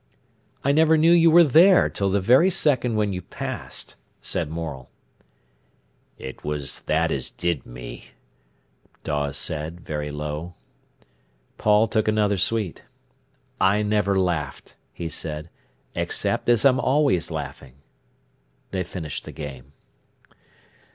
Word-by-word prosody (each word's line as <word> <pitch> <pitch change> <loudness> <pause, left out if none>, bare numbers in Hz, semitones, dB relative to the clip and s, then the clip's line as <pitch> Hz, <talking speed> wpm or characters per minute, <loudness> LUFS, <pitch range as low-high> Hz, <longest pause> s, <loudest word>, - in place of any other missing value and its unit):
"I 140 - +3
never 160 +2 +4
knew 160 +2 +5
you 170 -1 +6
were 170 +2 +8
there 170 +6 +6
till 100 -1 -1
the 100 +1 +2
very 130 - +5
second 135 -10 +1
when 105 -2 0
you 90 - -4
passed," - - -6 0.2
said - - -3
Morel. 80 -5 -6 1.3
"It 65 - -9
was 75 -2 -3
that 80 +1 +2
as 65 - -2
did 85 -6 -3
me," - - -9 1.0
Dawes 70 -1 -2
said, 80 +3 -3
very 75 -2 -4
low. 75 +3 -5 1.0
Paul 105 +1 +4
took 110 0 0
another 105 -2 +2
sweet. 105 -2 -1 0.8
"I 100 +2 +3
never 105 -2 +1
laughed," 80 -7 -2 0.2
he 85 - -5
said, 75 0 -5 0.4
"except - - -1
as 120 +1 +4
I'm 130 -1 +5
always 135 - +2
laughing." 65 -1 -7 1.0
They 95 -1 -1
finished 85 -4 -6
the - - -8
game. 70 -2 -8
95 Hz, 125 wpm, -24 LUFS, 75-120 Hz, 1.3 s, were